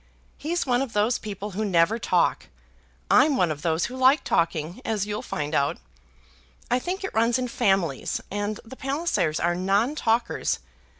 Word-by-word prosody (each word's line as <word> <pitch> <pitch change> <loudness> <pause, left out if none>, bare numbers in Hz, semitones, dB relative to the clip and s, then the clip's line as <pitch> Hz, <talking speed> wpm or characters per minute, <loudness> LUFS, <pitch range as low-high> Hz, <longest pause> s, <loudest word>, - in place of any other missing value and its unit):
He's 340 +4 -1
one 245 -1 +2
of 265 -5 -4
those 215 +4 +2
people 205 -1 -6
who 205 +3 -2
never 195 +3 +2
talk. - - +1 0.6
I'm 295 -3 +5
one 175 -3 +2
of 150 -1 -5
those 165 +1 +1
who 250 - -6
like 260 +3 +4
talking, 165 +4 0
as 215 -5 -1
you'll 210 0 -3
find 150 +1 -4
out. 140 -1 +1 0.9
I 250 - +3
think 365 +8 -4
it 385 - -4
runs 230 +2 +3
in 255 -1 -2
families; 195 - 0
and 205 +1 -2
the 230 - -10
Pallisers 270 - -1
are 175 +1 +1
non 195 +9 +1
talkers. 235 -5 0
215 Hz, 170 wpm, -25 LUFS, 175-255 Hz, 0.9 s, I'm